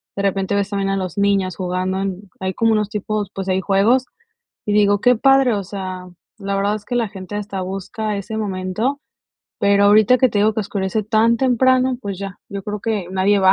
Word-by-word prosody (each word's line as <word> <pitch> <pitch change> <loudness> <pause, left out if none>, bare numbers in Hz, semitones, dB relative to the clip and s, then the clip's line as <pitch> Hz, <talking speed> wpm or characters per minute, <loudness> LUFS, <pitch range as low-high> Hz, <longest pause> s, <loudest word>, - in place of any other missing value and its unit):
De 200 - -2
repente 195 0 0
ves 200 0 0
también 195 -1 -1
a 195 - 0
los 185 -2 -4
niños 195 -2 +1
jugando 185 +1 -2
en 195 -1 -3 0.2
Hay 190 0 -2
como 225 0 +2
unos 210 -2 +1
tipos 210 -1 -3
pues, 195 -1 -4
hay 190 0 +1
juegos 210 +8 +3 0.6
y 210 - 0
digo: 205 -1 +4
"Qué 250 0 +5
padre", 270 +1 +4
o 200 - -2
sea, 185 -1 -6 0.3
la 200 -1 -2
verdad 200 +1 +1
es 210 -1 -8
que 245 - -3
la 235 -2 +1
gente 190 0 -8
hasta 200 -2 -4
busca 195 +3 -4
ese 200 +2 -6
momento, 210 +7 -2 0.6
pero 200 0 +4
ahorita 215 +4 +5
que 255 - +4
te 210 - -1
digo 215 +1 +3
que 220 - 0
oscurece 200 +1 -2
tan 225 +2 +3
temprano, 255 0 +3
pues 200 -4 -5
ya, 195 0 -7
yo 200 -1 -5
creo 210 0 -5
que 210 -4 -2
nadie 190 +2 +2
va. 190 0 +6
200 Hz, 215 wpm, -20 LUFS, 190-220 Hz, 0.6 s, va